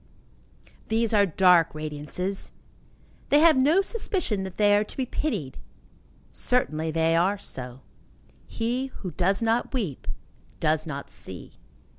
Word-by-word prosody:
These 225 0 +1
are 205 -1 +4
dark 175 -2 +4
radiances. 155 +5 -4 0.8
They 290 - +5
have 325 -1 +7
no 295 +9 +4
suspicion 380 - -1
that 190 - -8
they 205 -1 +5
are 205 - +3
to - - -11
be 260 - 0
pitied. 210 - -3 0.7
Certainly 160 -11 +1
they 165 +1 +2
are 185 +5 +2
so. 125 -7 -7 0.7
He 245 +4 -2
who 195 -8 -8
does 190 +7 0
not 230 +4 0
weep 190 - -3 0.5
does 155 0 +1
not 140 -2 -6
see. - - -8
195 Hz, 130 wpm, -26 LUFS, 160-235 Hz, 0.8 s, have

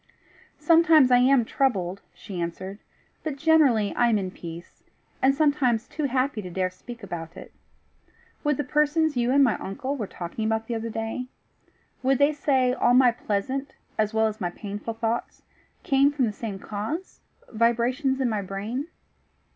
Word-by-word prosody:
"Sometimes 325 -5 +5
I 245 - +7
am 255 -1 +4
troubled," 200 -9 0
she 190 -4 -7
answered; 185 +4 -5 0.4
"but 310 -3 -3
generally 280 -9 +3
I 240 - +3
am 220 - +3
in 190 -2 -3
peace, 170 -1 -10 0.4
and 270 +1 +4
sometimes 280 -6 +2
too 305 - -3
happy 260 -3 0
to 185 - -7
dare 185 +1 -1
speak 235 +5 -11
about 165 -4 -7
it. - - -11 0.9
Would 295 -3 +1
the 295 - -1
persons 300 +1 +1
you 240 0 +1
and 280 +2 +5
my 240 -5 +2
uncle 265 +8 -4
were 220 -7 -4
talking 175 +6 -6
about 220 0 0
the 235 - -4
other 230 0 -3
day 225 +3 -4 0.7
would 265 +1 +2
they 285 +3 +4
say 265 -4 +2
all 245 -1 +3
my 255 -1 +6
pleasant 245 +4 -3 0.2
as 215 -1 0
well 220 0 +2
as 215 0 -3
my 175 - 0
painful 205 +4 -6
thoughts 225 +1 -3 0.4
came 275 +1 +3
from 280 -3 +1
the 215 - -2
same 210 -2 -5
cause 220 - -5 0.3
vibrations 240 +4 +1
in 260 - +1
my 215 -3 -1
brain?" 210 - -4
240 Hz, 170 wpm, -25 LUFS, 210-275 Hz, 0.9 s, I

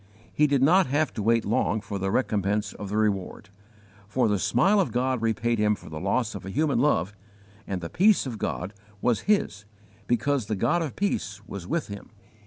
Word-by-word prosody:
He 150 - +3
did 140 -2 +2
not 180 +6 +5
have 145 +1 0
to 110 - -4
wait 115 +2 +2
long 110 +1 +1
for 100 -1 -6
the 95 0 -1
recompense 105 -2 0
of 100 - -7
the 105 - -2
reward, 100 -4 -1 0.6
for 120 +3 +1
the 105 -2 +1
smile 185 - +3
of 190 - +1
God 125 0 0
repaid 115 +1 0
him 105 0 +3
for - - -13
the 80 - -5
loss 105 +5 0
of 100 - -7
a 95 - -7
human 145 +4 +1
love, 105 - +1 0.5
and 95 -2 -3
the 85 - -4
peace 205 -1 +4
of 120 -5 -5
God 95 +2 -3 0.3
was 120 0 0
his 195 - +1 0.4
because 120 0 0
the 110 - -1
God 170 - +1
of 155 -6 -4
peace 105 - -2
was 95 -5 -8
with 170 - -1
him. 100 0 -9
110 Hz, 200 wpm, -26 LUFS, 100-140 Hz, 0.6 s, not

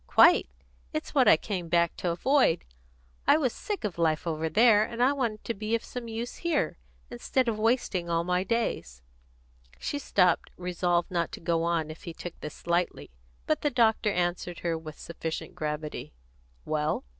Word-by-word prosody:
"Quite! - - +6 0.4
It's - - -4
what - - +4
I - - +8
came 180 -1 -4
back 170 0 +2
to 180 - -1
avoid. 255 - +2 0.6
I - - +7
was 260 -7 0
sick 415 - -4
of 205 -5 -3
the - - -2
life 155 -1 +1
over 160 -1 -1
there, 215 +1 +5
and 230 +1 -6
I 265 +3 +4
wanted 235 -6 -2
to 230 - -2
be 215 +2 -1
of 230 - -3
some 245 -2 -7
use 230 +2 -5
here, 310 - -1 0.3
instead 250 - 0
of 220 -2 -1
wasting 215 -6 +1
all 165 0 +1
my 180 +1 +1
days." 180 - -2 0.7
She 290 - -3
stopped, 185 -9 +2
resolved 175 -1 0
not 170 -2 0
to - - -6
go 165 -1 0
on 165 -2 0
if 155 - -12
he 170 -2 -6
took 175 - -7
this 150 - -9
lightly, 170 - -1 0.3
but - - 0
the 295 - +2
doctor 230 -4 +3
answered 175 -2 -2
her 170 -1 0
with 160 -2 -8
sufficient 165 -1 -5
gravity: 150 - -4 0.5
"Well?" 155 0 -1
180 Hz, 180 wpm, -28 LUFS, 165-230 Hz, 0.7 s, I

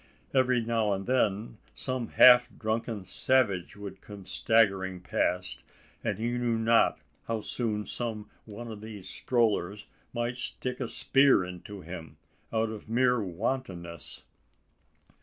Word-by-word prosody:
Every 130 -2 +3
now 110 -3 +1
and 95 0 -3
then 110 -3 0 0.2
some 130 -3 -3
half 125 -1 +7
drunken 110 -2 -2
savage 105 -3 +1
would 100 -2 -8
come 100 -2 -11
staggering 95 -2 +2
past; 90 0 -1 0.4
and 100 - -1
he 120 +2 -1
knew 120 -2 +1
not 115 +1 +4 0.3
how 115 -1 -1
soon 105 -2 -2
some 110 -3 -4 0.2
one 115 +2 -8
of 105 -1 -8
these 105 -4 -8
strollers 105 -3 0 0.3
might 120 +1 -2
stick 125 +1 -3
a 125 - -2
spear 135 -5 +4
into 90 +2 -8
him, 85 -3 -9 0.3
out 110 0 +1
of 110 0 -9
mere 125 0 +3
wantonness! 90 - -4
110 Hz, 130 wpm, -29 LUFS, 95-120 Hz, 0.4 s, half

